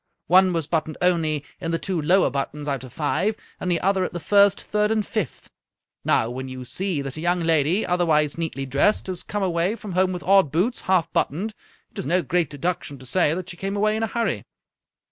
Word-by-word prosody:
One 185 +1 +5
was 165 -3 0
buttoned 160 0 -2
only 160 -5 +1
in 165 - -4
the 165 - +1
two 180 -2 -2
lower 180 +1 +3
buttons 145 +2 -3
out 135 -2 -2
of 130 - -10
five, 175 - 0 0.2
and 180 - -3
the 170 - +2
other 190 0 +2
at - - -3
the 175 - -3
first, 200 +2 +4
third, 210 0 0
and 215 -2 +1
fifth. 215 - -4 0.6
Now, 110 - +2
when 130 +1 -5
you 130 0 -7
see 175 +2 -2
that 135 +1 -5
a - - -5
young 175 +1 +1
lady, 165 +4 +2
otherwise 160 -5 +2
neatly 160 -5 -3
dressed, 140 +10 +2
has 185 -2 -2
come 205 -1 -3
away 180 +3 +1
from 210 -4 -8
home 185 +1 +2
with 180 -1 -5
odd 195 -6 +4
boots, 190 - 0
half 185 -3 +1
buttoned, 195 +10 -1 0.4
it - - -9
is 195 - -3
no 180 +1 +2
great 170 +4 0
deduction 145 -1 -3
to 130 - -13
say 160 +3 +2
that 185 0 -5
she 170 - -11
came 195 +3 -3
away 215 +1 +2
in 220 - -2
a 225 - +1
hurry." 230 +2 -1
175 Hz, 220 wpm, -23 LUFS, 150-195 Hz, 0.6 s, One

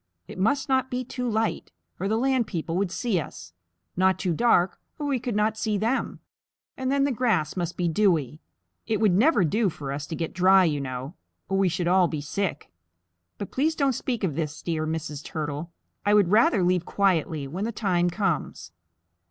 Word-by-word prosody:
It - - -9
must 270 +9 +1
not 260 -1 +1
be 250 0 -2
too 250 0 -4
light, 220 0 -1 0.3
or 195 - -1
the 220 +2 +1
land 260 -2 +1
people 165 -3 -3
would 190 0 0
see 210 -3 0
us; 85 - -8 0.4
not 190 +1 +3
too 180 -3 -1
dark, 190 -3 +2 0.2
or 295 - -4
we 275 -3 0
could 240 -2 -3
not 215 +1 +1
see 215 -2 0
them. 230 +6 -1 0.5
And 260 0 -2
then 280 0 +2
the 280 - +2
grass 220 - 0
must 175 -2 -3
be 175 - 0
dewy. 160 - +1 0.5
It 220 -2 0
would 215 -3 +4
never 220 - +4
do 205 +6 +2
for 140 -4 -6
us 145 +1 -4
to 160 - -4
get 165 -1 -4
dry, 185 +1 +5
you 150 -5 0
know, 130 +2 -5 0.4
or 195 0 +1
we 195 -2 +3
should 175 0 -2
all 180 0 +4
be 155 -2 -4
sick. 150 - -3 0.7
But 200 - -6
please 310 +4 +1
don't 275 -3 +2
speak 240 -2 -3
of 175 -6 0
this, 150 0 -4
dear 155 -2 -1
Mrs. 155 -2 -4
Turtle. 150 +1 -4 0.3
I 205 +1 +3
would 200 -4 +4
rather 215 -2 +4
leave 180 -1 +2
quietly 165 -7 0
when 180 +9 -4
the 230 - -2
time 180 -5 +1
comes." 175 - -2
190 Hz, 200 wpm, -26 LUFS, 160-225 Hz, 0.7 s, dry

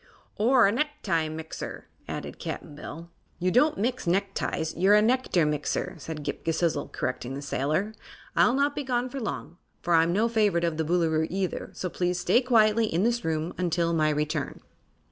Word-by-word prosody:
"Or 240 +2 +5
a 195 - +4
necktie 210 - -1
mixer," 160 0 -7 0.2
added - - -6
Cap'n - - -6
Bill. 160 +3 -9 0.3
"You 185 +1 0
don't 295 +8 +4
mix 240 0 -1
neckties; 190 -3 -1
you're 190 +5 +5
a 210 - +6
nectar 235 -8 +2
mixer," 150 -1 -1
said 155 +1 -6
Ghip - - -4
Ghisizzle, 165 -2 0
correcting 130 0 -3
the 140 - -5
sailor. 155 +10 -1 0.4
"I'll 245 - +4
not 285 +1 +1
be 290 - -2
gone 250 -1 -1
long, 220 -8 -5 0.3
for 175 - +1
I'm 165 +1 +4
no 210 +6 +2
favorite 210 -7 +2
of 165 -2 0
the 160 - +1
Boolooroo, 160 -1 +1
either, 190 -1 -2
so 185 - -3
please 180 0 -1
stay 235 +7 +3
quietly 225 -3 +4
in 175 -1 0
this 235 +1 +1
room 160 +1 -1
until 170 -1 +1
my 155 -2 +3
return." 150 0 -2
175 Hz, 175 wpm, -27 LUFS, 160-225 Hz, 0.4 s, a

